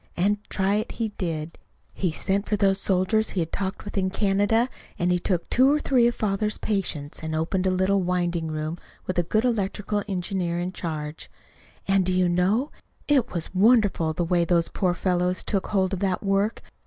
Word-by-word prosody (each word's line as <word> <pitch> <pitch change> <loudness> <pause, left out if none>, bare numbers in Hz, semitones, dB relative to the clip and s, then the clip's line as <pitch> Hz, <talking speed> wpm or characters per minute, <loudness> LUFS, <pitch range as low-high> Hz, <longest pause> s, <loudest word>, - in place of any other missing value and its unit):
And 200 +4 +2
try 195 +1 +1
it 215 - -3
he 225 -2 -2
did. 165 -5 -4 0.3
He 180 -3 -1
sent 195 +5 -1
for 210 - +2
those 195 -1 +2
soldiers 195 +4 +1
he 190 - -3
had 165 - -3
talked 195 +1 -3
with 205 -1 -2
in 190 0 0
Canada, 205 +4 +2 0.3
and 175 +1 +1
he 180 - +2
took 180 -1 -1
two 260 +3 +4
or 300 - +2
three 250 -5 +3
of 240 - 0
father's 210 0 -1
patients, 175 -8 -2
and 160 0 -3
opened 185 +4 0
a - - +4
little 190 +1 +2
winding 175 -2 -1
room 155 +2 -4 0.3
with 185 -1 -1
a 170 - -2
good 220 +3 +2
electrical 205 -2 -1
engineer 180 -2 -2
in 180 +1 -2
charge. 155 -4 -5 0.6
And, 195 -1 +3
do 185 +1 0
you 180 0 +3
know? 190 - +1 0.4
it 270 -5 +2
was 170 -1 -4
wonderful, 200 -5 +3
the 175 +2 -1
way 175 0 +2
those 170 -1 +2
poor 180 -2 0
fellows 180 0 0
took 195 -2 -1
hold 190 -2 +1
of 190 - -2
that 190 -1 -1
work! 200 +2 0
190 Hz, 195 wpm, -25 LUFS, 175-205 Hz, 0.6 s, two